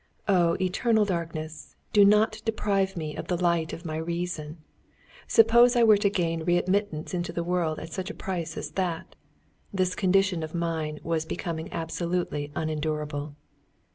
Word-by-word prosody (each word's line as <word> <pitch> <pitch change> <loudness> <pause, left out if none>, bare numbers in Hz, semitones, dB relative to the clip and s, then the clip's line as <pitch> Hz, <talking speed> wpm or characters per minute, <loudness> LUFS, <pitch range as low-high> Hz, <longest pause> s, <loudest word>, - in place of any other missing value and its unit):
Oh, 175 -4 +3
eternal 215 +4 +2
darkness, 165 -4 -5 0.2
do 205 - +7
not 215 +2 +4
deprive 200 -4 0
me 155 -2 -4
of - - -6
the 180 - 0
light 170 -2 +1
of 170 - -8
my 155 -1 -3
reason! 170 -1 -4 0.7
Suppose 235 +2 +6
I 240 - +5
were 215 -2 +7
to 200 0 +2
gain 165 -5 -1
readmittance 175 -1 0
into 175 -1 -2
the 170 - -2
world 170 -3 0
at 165 - -8
such 185 +1 -4
a - - -6
price 180 -4 -4
as 150 - -5
that! 170 -1 -3 0.6
This 185 -3 0
condition 190 -2 +2
of 155 +1 -5
mind 160 -3 -2
was 165 -1 0
becoming 160 -1 -5
absolutely 165 -3 -2
unendurable. 150 -2 -3
175 Hz, 155 wpm, -27 LUFS, 160-195 Hz, 0.7 s, do